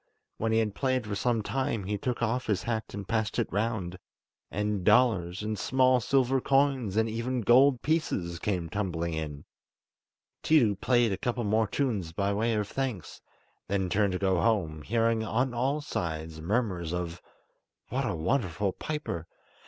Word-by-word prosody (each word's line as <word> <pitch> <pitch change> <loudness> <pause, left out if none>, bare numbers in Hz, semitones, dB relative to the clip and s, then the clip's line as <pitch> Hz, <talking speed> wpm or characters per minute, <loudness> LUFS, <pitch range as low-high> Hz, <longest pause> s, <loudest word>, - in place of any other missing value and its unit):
When 110 0 0
he 110 - +3
had 110 -2 +1
played 130 0 0
for 105 - -4
some 115 +2 0
time 130 -4 -1
he 105 +2 -2
took 120 +3 -2
off 125 +3 -1
his 105 -4 0
hat 110 -2 -3
and 100 -1 -6
passed 110 -2 -1
it - - +1
round, 100 -4 -2 0.5
and 105 -1 -1
dollars, 100 -6 +3
and 105 -1 -3
small 130 -1 +3
silver 130 +2 +2
coins, 135 -7 +2
and 110 0 +3
even 120 +3 -2
gold 125 +3 +5
pieces, 95 - -1
came 90 -5 -1
tumbling 85 -3 -2
in. 75 -2 -5 1.0
Tiidu 120 -11 +4
played 120 -3 +3
a 95 - -1
couple 120 -1 -1
more 110 +1 +2
tunes 100 - -1
by 100 +3 0
way 115 +2 +1
of 105 -1 -1
thanks, 125 -8 -4 0.5
then 95 -2 0
turned 100 -1 +2
to - - 0
go 95 -3 +1
home, 85 -10 +1
hearing 115 +4 +1
on 125 +4 0
all 135 +5 0
sides 80 - -4
murmurs 90 -3 -1
of 85 -1 -4 0.7
"What - - -1
a - - -1
wonderful 95 - 0
piper! 110 - -4
110 Hz, 165 wpm, -29 LUFS, 95-125 Hz, 1.0 s, gold